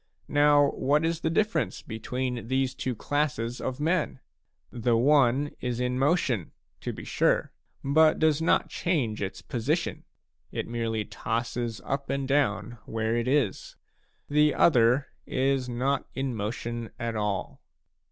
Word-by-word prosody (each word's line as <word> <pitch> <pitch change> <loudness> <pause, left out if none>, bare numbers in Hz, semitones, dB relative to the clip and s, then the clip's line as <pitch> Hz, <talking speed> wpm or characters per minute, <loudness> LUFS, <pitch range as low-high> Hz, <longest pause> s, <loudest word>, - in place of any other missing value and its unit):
Now 145 -1 +5
what 145 +4 +1
is 165 0 0
the 160 - 0
difference 165 - 0
between 125 +2 -4
these 130 0 +1
two 130 -2 -3
classes 125 -3 -1
of 130 +1 -3
men? 160 -3 0 0.5
The 120 -1 +1
one 140 +1 +3
is 125 -1 -2
in 125 0 0
motion, 135 - +1 0.3
to - - -4
be - - -8
sure, - - +1 0.3
but 155 +3 +4
does 155 -1 +2
not 165 - +3
change 135 -12 -1
its 95 -1 -4
position; 145 +8 -2 0.5
it - - -3
merely 115 -2 -2
tosses 115 0 -3
up 140 0 -3
and 135 -1 -1
down 120 -4 0
where 110 0 -1
it 120 +1 -1
is; 130 -8 0 0.5
the 150 0 +3
other 125 -2 +4 0.2
is 135 -1 0
not 130 +3 -1
in 135 -1 -2
motion 115 +2 -4
at 115 -1 -3
all. 105 -2 -2
130 Hz, 140 wpm, -27 LUFS, 115-145 Hz, 0.5 s, Now